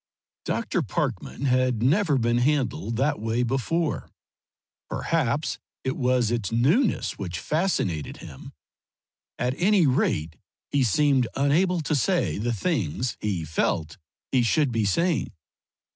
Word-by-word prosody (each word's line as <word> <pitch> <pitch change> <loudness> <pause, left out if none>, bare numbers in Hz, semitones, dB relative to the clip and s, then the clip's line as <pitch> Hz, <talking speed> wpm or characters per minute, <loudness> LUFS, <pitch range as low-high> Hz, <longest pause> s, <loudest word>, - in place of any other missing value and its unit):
Dr. - - -1
Parkman 140 - -3
had 125 -3 +2
never 150 +2 +3
been 120 0 +1
handled 125 -5 0
that 135 +1 +1
way 115 +3 0
before; 135 +6 -1 0.8
perhaps 150 -3 -1 0.2
it 130 - -1
was 125 -3 +1
its 115 -5 -1
newness 155 - +1
which 90 -3 -4
fascinated 125 - -1
him; - - -11 0.9
at 125 +1 0
any 190 -1 +4
rate 80 - 0 0.3
he 140 -2 +2
seemed 130 +2 +3
unable 165 +6 +2
to 155 - -2
say 170 - +1
the 120 +3 -1
things 120 - -1
he 95 -6 -2
felt 80 0 -1 0.3
he 130 - +3
should 135 +3 +2
be 115 -2 0
saying. 170 - +1
130 Hz, 125 wpm, -25 LUFS, 115-150 Hz, 0.9 s, any